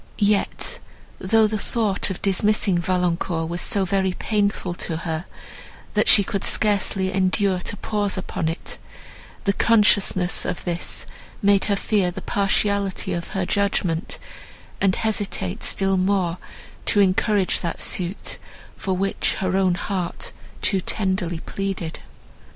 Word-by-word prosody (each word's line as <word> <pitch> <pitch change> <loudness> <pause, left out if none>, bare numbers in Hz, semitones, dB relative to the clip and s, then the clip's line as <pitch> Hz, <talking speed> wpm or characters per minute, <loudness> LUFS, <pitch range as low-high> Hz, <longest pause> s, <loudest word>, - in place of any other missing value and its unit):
Yet, 205 -1 +1 0.4
though 220 +4 +3
the 215 0 -1
thought 210 -3 0
of 190 - -6
dismissing 200 -1 +2
Valancourt 175 -2 0
was 175 +1 -3
so 195 -2 0
very 190 0 +1
painful 200 -3 -1
to 165 -2 -3
her, 160 +1 -3 0.7
that - - +2
she 205 - +8
could 195 0 -3
scarcely 195 -2 +1
endure 185 0 +2
to 205 - -5
pause 205 -2 -1
upon 165 -3 -2
it, 165 - -5 0.6
the 200 - +2
consciousness 205 -5 +3
of - - -3
this 175 -1 0 0.4
made 200 -1 +4
her 205 - +1
fear 195 -2 +1
the 175 - -7
partiality 200 0 0
of 170 -1 -3
her 190 - 0
judgment, 185 -4 0 0.6
and 195 -2 +3
hesitate 205 - -1
still 195 -1 +1
more 185 -2 +1 0.5
to 205 - +4
encourage 200 0 +2
that 170 - -4
suit, 180 +2 0 0.4
for 190 -1 -2
which 195 +2 0
her 185 -1 -1
own 190 -2 +3
heart 180 -2 -3 0.3
too 195 - +3
tenderly 185 -4 -1
pleaded. 195 -4 -4
190 Hz, 135 wpm, -23 LUFS, 180-200 Hz, 0.7 s, she